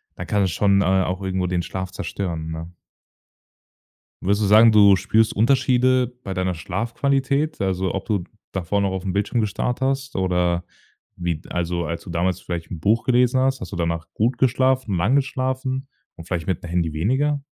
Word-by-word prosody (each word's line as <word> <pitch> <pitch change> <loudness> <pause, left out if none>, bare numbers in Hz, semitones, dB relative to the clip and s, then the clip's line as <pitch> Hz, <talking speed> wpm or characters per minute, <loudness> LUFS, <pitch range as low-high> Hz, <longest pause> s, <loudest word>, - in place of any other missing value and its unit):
dann - - -7
kann 105 - +1
das 95 - 0
schon, 100 +2 +3
äh, - - +1
auch 95 0 +1
irgendwo 95 -1 -1
den 90 -1 -1
Schlaf 95 +1 -5
zerstören, 80 -5 -4
ne? 80 +2 -7 1.5
Würdest 100 +3 +1
du - - +2
sagen, 110 +3 +7
du 100 -2 +7
spürst 110 +4 +1
Unterschiede 130 +2 +3 0.2
bei 95 - -4
deiner 95 0 -1
Schlafqualität? 135 - -1
Also 95 -1 -1
ob 95 - -4
du 105 -6 -1 0.3
davor 95 +2 -1
noch 100 - 0
aufm 95 0 -3
Bildschirm 105 +4 0
gestarrt 110 +4 -2
hast 135 0 -1
oder 90 -2 +1 0.5
wie 85 -1 -1
d 75 - -14
also, 85 0 -2
als 85 0 -4
du - - -11
damals 85 +2 0
vielleicht 85 -2 -5
'n 85 - -5
Buch 110 +7 +2
gelesen 125 0 +3
hast, 130 0 +1
hast - - -7
du - - -5
danach 85 -1 -2
gut 120 +4 0
geschlafen, 130 -3 +2
lang 100 +10 +2
geschlafen 130 0 -1 0.3
und 80 - -11
vielleicht 85 -3 -3
mit 95 -4 -2
'm - - -6
Handy 85 -2 -1
weniger? 135 - 0
100 Hz, 185 wpm, -22 LUFS, 90-125 Hz, 1.5 s, sagen